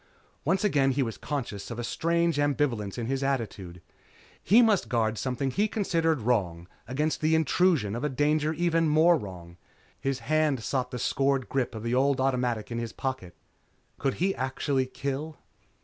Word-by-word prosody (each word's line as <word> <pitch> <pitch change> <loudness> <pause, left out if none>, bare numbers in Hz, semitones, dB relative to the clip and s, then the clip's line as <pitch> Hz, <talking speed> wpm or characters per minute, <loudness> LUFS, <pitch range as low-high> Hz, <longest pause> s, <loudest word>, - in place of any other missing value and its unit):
Once 190 +8 +1
again 145 -10 +3
he 135 +1 +1
was 115 -3 -4
conscious 120 -9 -5
of 115 - -6
a 120 - -3
strange 170 +4 0
ambivalence 130 -8 0
in 120 - -3
his 135 +3 -1
attitude. 105 -10 -3 0.6
He 230 +6 +6
must 215 -4 +2
guard 115 -3 +1
something 130 +1 -2
he 205 +9 +1
considered 165 - 0
wrong 90 -8 0 0.2
against 150 +6 -1
the 155 +1 +3
intrusion 160 - +2
of 120 - -4
a 150 - +1
danger 150 +3 +1
even 165 0 +1
more 160 +3 +5
wrong. 90 - -8 0.4
His 135 -1 -1
hand 145 0 0
sought 125 0 -1
the 125 - -5
scored 135 +2 0
grip 130 -4 -1
of 110 - -6
the 115 +1 -1
old 135 +1 +2
automatic 125 -4 0
in 115 - -2
his 115 -1 -5
pocket. 130 -10 -4 0.6
Could 135 - 0
he 190 +3 +1
actually 130 -1 -1
kill? 140 +4 -4
135 Hz, 170 wpm, -27 LUFS, 115-155 Hz, 0.6 s, He